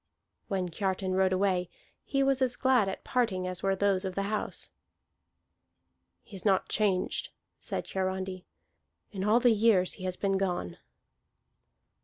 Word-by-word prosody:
When 185 -2 -1
Kiartan 190 +1 -1
rode 190 0 +3
away, 185 -2 +1 0.3
he 275 -1 0
was 270 -1 +2
as 255 -2 +2
glad 255 -7 +3
at 190 - -6
parting 220 -8 0
as 185 0 -3
were 195 0 +1
those 195 -1 +1
of 190 -1 -4
the 200 - 0
house. 210 +1 -1 1.5
"He 205 - -13
is 190 - -7
not 195 -3 +2
changed," 200 -4 0 0.3
said - - -4
Hiarandi, 190 -1 -3 0.7
"in 190 -2 -4
all 215 +4 +4
the 245 -1 +5
years 210 -4 +3
he 185 - -7
has 185 -1 -3
been 195 -1 0
gone." 175 - -2
195 Hz, 150 wpm, -29 LUFS, 185-210 Hz, 1.5 s, the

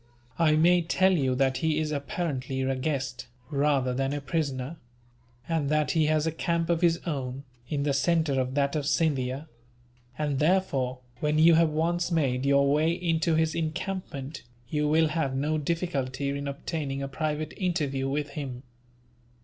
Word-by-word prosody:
I 155 -2 +4
may 175 +3 +5
tell 185 +3 +3
you 135 -8 +1
that 130 0 +2
he 160 -2 +1
is 155 -1 -1
apparently 140 -3 -3
a 135 0 0
guest, 130 -3 -3 0.2
rather 140 -3 +2
than 135 +2 -1
a 145 - -2
prisoner; 140 0 -2 0.7
and 160 -4 0
that 155 0 +2
he 155 -2 +2
has 155 0 +2
a 160 - +1
camp 165 +1 -1
of 170 0 +1
his 170 -1 +4
own, 135 -4 -3 0.3
in 145 -2 -1
the 145 -1 +1
centre 145 -1 +2
of 130 +1 -3
that 140 +1 +1
of 145 -2 -1
Scindia; 140 -2 0 0.7
and 145 -3 -1
therefore, 145 -7 +1 0.2
when 150 0 +1
you 165 +2 +7
have 165 0 +5
once 170 +3 0
made 135 -5 +1
your 140 0 +4
way 155 +3 +3
into 165 -2 +1
his 160 0 +2
encampment, 160 -3 -4 0.3
you 150 -1 0
will 160 +1 +3
have 155 -4 -1
no 150 +3 0
difficulty 140 -4 -2
in 140 0 -3
obtaining 140 -1 -3
a - - -2
private 155 +2 -3
interview 145 -8 -1
with 145 +1 -2
him. 135 -3 -6
150 Hz, 165 wpm, -27 LUFS, 135-160 Hz, 0.7 s, you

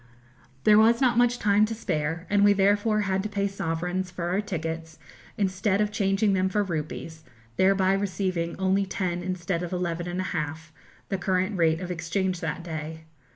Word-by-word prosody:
There 215 0 +6
was 230 +2 +5
not 245 -3 +3
much 245 0 +3
time 205 -1 +3
to 225 - -4
spare, 165 -5 -2
and 205 +2 +3
we 205 0 +6
therefore 205 +2 +2
had 190 -1 0
to 210 - -4
pay 200 -1 0
sovereigns 180 0 -2
for 175 -1 -4
our 190 +3 +1
tickets 165 -4 -5 0.4
instead 195 0 +1
of 210 0 +1
changing 200 -1 +1
them 190 0 +1
for 205 +2 +1
rupees, 160 -2 -5 0.3
thereby 190 +3 +3
receiving 185 -3 -1
only 190 +1 +1
ten 180 -2 -2
instead 180 -1 -2
of 175 - -4
eleven 175 -1 -2
and 175 +1 -3
a - - 0
half, 160 0 -4 0.4
the 195 - -1
current 190 +2 0
rate 165 -2 +2
of 180 0 -4
exchange 180 +2 -1
that 165 +1 -4
day. 160 -1 -6
185 Hz, 180 wpm, -26 LUFS, 170-200 Hz, 0.4 s, There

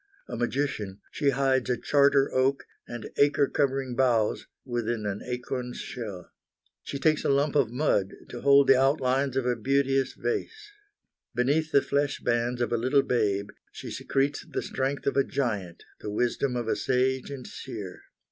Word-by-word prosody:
A 120 - -5
magician, 120 -5 -2
she 140 - +1
hides 135 -1 +1
a 125 - +1
charter 140 0 +3
oak 135 +1 +1 0.2
and 120 -2 -7
acre 145 0 +4
covering 135 -2 0
boughs 120 -4 +1 0.2
within 120 -3 -2
an 100 0 -3
acorn's 125 0 -4
shell. 105 -7 -7 0.5
She 140 - -5
takes 155 +2 +2
a - - +1
lump 140 +1 +2
of 140 -6 +3
mud 120 -7 0
to 120 - -7
hold 140 0 +6
the 130 -1 +5
outlines 135 -1 +1
of 130 - 0
a 125 -1 +1
beauteous 135 +2 +1
vase. 415 - -4 0.6
Beneath 145 +6 +1
the 140 - +4
flesh 140 0 0
bands 120 +1 0
of 120 -1 0
a - - +2
little 130 +4 +3
babe 100 -4 0 0.2
she - - -8
secretes 135 +1 -1
the - - -4
strength 135 +1 -2
of 140 - 0
a 140 - +5
giant, 105 -13 -3 0.2
the 105 - -6
wisdom 125 +4 0
of 120 -2 -2
a - - +1
sage 130 0 0
and 135 -3 -7
seer. 105 -8 -8
130 Hz, 165 wpm, -27 LUFS, 120-140 Hz, 0.6 s, hold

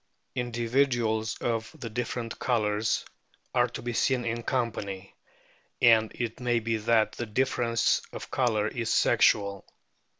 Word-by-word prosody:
Individuals 120 -2 0
of 115 -2 -2
the 115 - -6
different 120 0 -4
colours 110 -3 0 0.5
are 120 -1 +3
to 120 - -8
be 120 0 -3
seen 125 +1 +1
in 115 0 -2
company, 105 -6 -3 0.6
and 110 -2 +5
it 120 -1 -4
may 120 -1 +1
be 115 0 -1
that 110 0 +2
the 120 - -5
difference 115 0 +1
of - - -8
colour 110 -5 +1
is 115 0 -3
sexual. 100 -1 +3
115 Hz, 130 wpm, -28 LUFS, 110-120 Hz, 0.6 s, and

